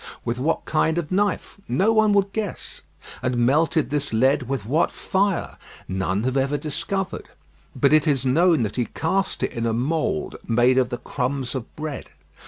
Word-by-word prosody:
With 120 Hz, +1 st, -2 dB
what 155 Hz, +5 st, 0 dB
kind 160 Hz, +1 st, +1 dB
of 170 Hz, -2 st, -3 dB
knife? 200 Hz, +1 st, -1 dB
No 190 Hz, -, +2 dB
one 215 Hz, -1 st, +4 dB
would 200 Hz, -1 st, +2 dB
guess. 215 Hz, -4 st, -5 dB, 0.4 s
And 125 Hz, -1 st, -1 dB
melted 145 Hz, +5 st, +2 dB
this 145 Hz, -1 st, -1 dB
lead 130 Hz, +3 st, +2 dB
with 135 Hz, -7 st, -2 dB
what 150 Hz, +9 st, +2 dB
fire? 195 Hz, -1 st, -1 dB, 0.3 s
None 95 Hz, +2 st, -1 dB
have 130 Hz, +2 st, 0 dB
ever 135 Hz, +2 st, +1 dB
discovered; 165 Hz, +6 st, -4 dB, 0.5 s
but 140 Hz, +1 st, +3 dB
it 155 Hz, +1 st, +4 dB
is 135 Hz, -3 st, +1 dB
known 160 Hz, +1 st, +4 dB
that 105 Hz, +2 st, -4 dB
he 120 Hz, -, +1 dB
cast 190 Hz, +9 st, -1 dB
it -, -, 0 dB
in 115 Hz, 0 st, -2 dB
a 115 Hz, -, 0 dB
mould 160 Hz, -, -1 dB
made 120 Hz, +3 st, +4 dB
of 125 Hz, -, +1 dB
the 120 Hz, -, -3 dB
crumbs 130 Hz, +1 st, -3 dB
of 130 Hz, -3 st, -6 dB
bread. 150 Hz, -2 st, -5 dB
140 Hz, 180 wpm, -23 LUFS, 125-170 Hz, 0.5 s, one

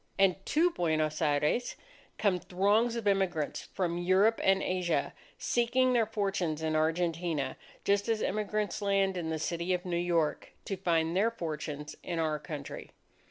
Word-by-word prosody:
And 195 Hz, -1 st, +3 dB
to 340 Hz, +4 st, +3 dB
Buenos 155 Hz, -, 0 dB
Aires 150 Hz, +10 st, +1 dB, 0.4 s
come 195 Hz, -4 st, +2 dB
throngs 205 Hz, +7 st, +2 dB
of 230 Hz, -3 st, -3 dB
immigrants 190 Hz, -7 st, 0 dB
from 175 Hz, -2 st, -1 dB
Europe 190 Hz, +5 st, +3 dB
and 195 Hz, 0 st, +3 dB
Asia, 180 Hz, -2 st, 0 dB, 0.2 s
seeking 250 Hz, +2 st, +2 dB
their 230 Hz, -3 st, +3 dB
fortunes 195 Hz, -7 st, -1 dB
in 155 Hz, 0 st, 0 dB
Argentina; 160 Hz, -3 st, 0 dB, 0.3 s
just 200 Hz, +2 st, +2 dB
as 220 Hz, -1 st, +1 dB
immigrants 210 Hz, +1 st, -1 dB
land 195 Hz, -1 st, +2 dB
in 170 Hz, -3 st, -3 dB
the 160 Hz, -, -1 dB
City 170 Hz, +3 st, -1 dB
of 180 Hz, -, -6 dB
New 175 Hz, -1 st, -2 dB
York, 170 Hz, -3 st, 0 dB
to 195 Hz, -, -2 dB
find 170 Hz, -3 st, +1 dB
their 210 Hz, +5 st, +3 dB
fortunes 150 Hz, -7 st, -5 dB
in 175 Hz, -, -4 dB
our 155 Hz, -2 st, 0 dB
country. 150 Hz, -1 st, -7 dB
180 Hz, 155 wpm, -30 LUFS, 160-200 Hz, 0.4 s, And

